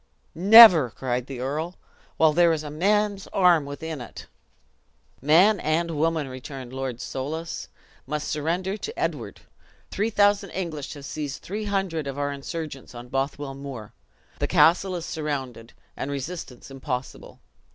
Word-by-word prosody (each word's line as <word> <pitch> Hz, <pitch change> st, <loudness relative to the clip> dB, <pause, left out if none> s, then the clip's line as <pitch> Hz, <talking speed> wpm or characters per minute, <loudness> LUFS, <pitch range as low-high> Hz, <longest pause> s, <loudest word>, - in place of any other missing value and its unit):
"Never!" 185 Hz, -, +9 dB
cried 125 Hz, +1 st, -3 dB
the 130 Hz, -3 st, -6 dB
earl, 155 Hz, +7 st, -3 dB, 0.4 s
"while 160 Hz, -1 st, +4 dB
there 170 Hz, +1 st, +5 dB
is 155 Hz, -1 st, -3 dB
a 150 Hz, -, -7 dB
man's 200 Hz, +4 st, 0 dB
arm 175 Hz, -6 st, +3 dB
within 150 Hz, 0 st, -6 dB
it." 120 Hz, -, -10 dB, 1.0 s
"Man 175 Hz, -, +5 dB
and 165 Hz, +2 st, 0 dB
woman," 160 Hz, -1 st, 0 dB
returned 130 Hz, 0 st, -8 dB
Lord 130 Hz, -2 st, -4 dB
Soulis, 155 Hz, +7 st, -5 dB, 0.4 s
"must 150 Hz, +1 st, -3 dB
surrender 175 Hz, +6 st, -2 dB
to 445 Hz, -, -7 dB
Edward. -, -, -3 dB, 0.5 s
Three 215 Hz, +3 st, 0 dB
thousand 205 Hz, -1 st, +2 dB
English 155 Hz, -6 st, -4 dB
have 140 Hz, -1 st, -10 dB
seized 145 Hz, -2 st, -5 dB
three 210 Hz, +3 st, -4 dB
hundred 190 Hz, -7 st, -2 dB
of 135 Hz, 0 st, -5 dB
our 145 Hz, 0 st, -1 dB
insurgents 140 Hz, -2 st, -7 dB
on 120 Hz, +1 st, -9 dB
Bothwell 135 Hz, +1 st, -3 dB
Moor. 135 Hz, -6 st, -8 dB, 0.5 s
The -, -, 0 dB
castle 185 Hz, +3 st, +4 dB
is 170 Hz, -1 st, -5 dB
surrounded, 135 Hz, -7 st, -5 dB, 0.2 s
and 135 Hz, -, -4 dB
resistance 140 Hz, -2 st, -6 dB
impossible. 135 Hz, -1 st, -6 dB
150 Hz, 140 wpm, -25 LUFS, 135-175 Hz, 1.0 s, Never